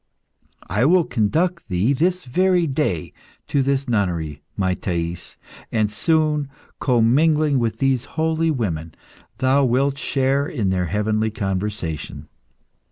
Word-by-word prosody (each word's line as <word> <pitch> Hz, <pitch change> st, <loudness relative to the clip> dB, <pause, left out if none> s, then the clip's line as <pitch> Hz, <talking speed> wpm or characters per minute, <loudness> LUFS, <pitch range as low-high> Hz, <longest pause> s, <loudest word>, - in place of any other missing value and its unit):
I 105 Hz, +5 st, 0 dB
will 175 Hz, +3 st, +5 dB
conduct 160 Hz, -, 0 dB
thee 95 Hz, +8 st, +2 dB
this 180 Hz, +6 st, 0 dB
very 180 Hz, +6 st, +2 dB
day 135 Hz, -, -1 dB, 0.3 s
to 140 Hz, -, +1 dB
this 135 Hz, 0 st, 0 dB
nunnery, 85 Hz, -, -1 dB, 0.2 s
my 95 Hz, -2 st, +1 dB
Thais, 85 Hz, -2 st, -4 dB, 0.3 s
and 110 Hz, -2 st, +1 dB
soon, 150 Hz, +3 st, +1 dB, 0.3 s
commingling 140 Hz, +4 st, +3 dB
with 115 Hz, -2 st, -1 dB
these 135 Hz, -3 st, +1 dB
holy 160 Hz, +1 st, +1 dB
women, 85 Hz, -, -2 dB, 0.4 s
thou 135 Hz, +2 st, +3 dB
wilt 135 Hz, +3 st, +1 dB
share 140 Hz, 0 st, +1 dB
in 105 Hz, -12 st, -1 dB
their 90 Hz, -1 st, 0 dB
heavenly 110 Hz, +4 st, 0 dB
conversation. 95 Hz, -6 st, -4 dB
125 Hz, 120 wpm, -21 LUFS, 100-150 Hz, 0.4 s, will